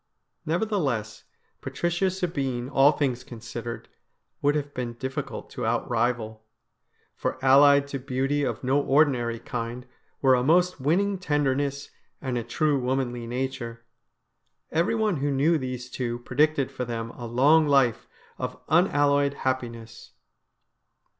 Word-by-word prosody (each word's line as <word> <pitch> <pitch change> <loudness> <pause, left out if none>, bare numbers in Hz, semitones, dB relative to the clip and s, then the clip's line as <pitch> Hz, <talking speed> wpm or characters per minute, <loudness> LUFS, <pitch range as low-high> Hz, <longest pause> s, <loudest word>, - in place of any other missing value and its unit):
Nevertheless, 155 - -1 0.4
Patricia 175 +2 -1
Sabine, 140 -9 -2
all 140 +1 +5
things 135 -5 -1
considered, 115 0 -7 0.5
would 145 +1 +2
have 145 -1 -3
been 120 -2 -4
difficult 130 +3 -5
to - - -5
outrival, 115 -2 -1 0.7
for - - -2
allied 140 +1 +6
to 135 - -4
beauty 135 +2 -1
of - - -3
no 135 +3 +2
ordinary 135 -5 +2
kind 120 +2 -5 0.3
were 135 -2 +4
a 125 - +3
most 175 +4 +3
winning 190 +7 +1
tenderness 140 -3 -1 0.3
and 130 -2 -3
a 120 - -1
true 145 +4 +1
womanly 125 -2 -2
nature. 120 -2 -4 0.9
Everyone 205 +4 +1
who 145 +1 -1
knew 150 +4 +2
these 125 -2 -5
two 120 -2 -3
predicted 140 +3 +1
for 135 -2 -4
them 115 -1 -4
a 120 -1 -8
long 145 +7 +4
life 135 -5 +2 0.3
of - - -4
unalloyed 145 -4 +3
happiness. 115 -3 -4
135 Hz, 125 wpm, -26 LUFS, 120-145 Hz, 0.9 s, allied